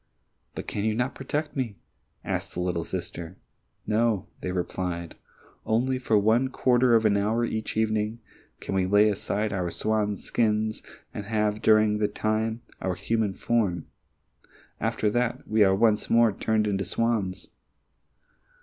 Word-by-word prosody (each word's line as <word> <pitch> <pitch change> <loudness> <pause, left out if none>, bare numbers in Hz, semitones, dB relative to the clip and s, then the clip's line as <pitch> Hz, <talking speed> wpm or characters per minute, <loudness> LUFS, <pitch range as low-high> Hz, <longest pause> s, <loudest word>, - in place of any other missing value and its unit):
"But - - -5
can 100 - -3
you 110 0 +1
not 125 +3 -1
protect 150 +3 -3
me?" 125 -7 -2 0.5
asked - - -3
the - - -3
little 90 -2 -1
sister. 85 0 -6 0.5
"No," 110 -3 +1 0.2
they 90 - -3
replied, 90 -1 -3 0.5
"only 130 +4 +1
for 115 -4 +2
one 110 +5 +3
quarter 125 -2 +3
of 110 -1 +3
an 105 -1 +4
hour 110 +4 +1
each 110 -1 -3
evening 110 0 0 0.4
can - - -5
we 95 -1 +1
lay 105 +2 +5
aside 105 +1 -1
our 90 -2 -1
swan's 105 +2 -1
skins 110 -1 0 0.3
and 105 - -5
have 105 0 0
during 110 -1 +4
that 105 - -1
time 110 +2 -1 0.2
our 95 -1 -1
human 110 -2 -1
form; 100 -8 0 0.9
after 110 - 0
that, 120 +1 -1
we 110 -1 +4
are 95 -1 +4
once 105 +1 +2
more 115 -1 +5
turned 110 +1 0
into 100 -2 0
swans." 100 -1 -1
110 Hz, 150 wpm, -26 LUFS, 100-115 Hz, 0.9 s, lay